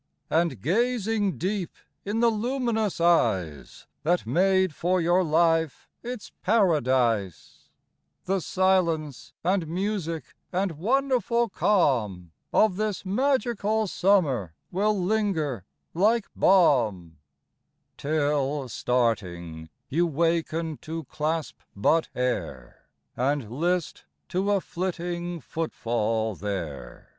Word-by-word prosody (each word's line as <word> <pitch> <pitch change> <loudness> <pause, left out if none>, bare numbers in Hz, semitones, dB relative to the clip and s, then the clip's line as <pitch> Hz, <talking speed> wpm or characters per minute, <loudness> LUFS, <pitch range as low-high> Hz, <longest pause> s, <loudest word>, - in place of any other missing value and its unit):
And 160 - +1
gazing 220 - +1
deep 190 0 -2 0.3
in 210 +3 -1
the 235 -1 +5
luminous 225 -3 -1
eyes 95 - +1 0.2
That 175 +3 +1
made 190 -1 +2
for 180 +4 +1
your 175 +2 +3
life 165 -1 +1
its 240 -3 -7
paradise, 130 - +1 0.2
— 70 +1 -50
The 195 +1 +1
silence 170 -7 0
and 180 -1 +1
music 175 -2 -3 0.2
and 185 +1 0
wonderful 235 +1 +1
calm 115 - +1 0.2
Of 210 -4 +3
this 210 -3 -2
magical 220 -1 +1
summer 155 - +1 0.2
will 205 +2 +1
linger 175 - 0 0.3
like 215 +5 +2
balm, 110 - +3 0.4
— - - -51
62 - - -8
SOMETIME. 155 -2 +2
Till, 140 -2 -1
Starting, 90 -10 -1 0.2
you 170 +6 +1
waken 165 0 0
to 160 +1 -6
clasp 155 +3 -3 0.2
but 155 +11 +2
air, 90 - -3 0.3
And 130 -3 -1
list 170 +5 -1 0.2
to 190 +3 0
a 200 -2 +2
flitting 175 -1 -4
footfall 115 -7 -1
there. 85 -11 -6
170 Hz, 105 wpm, -26 LUFS, 125-195 Hz, 0.4 s, the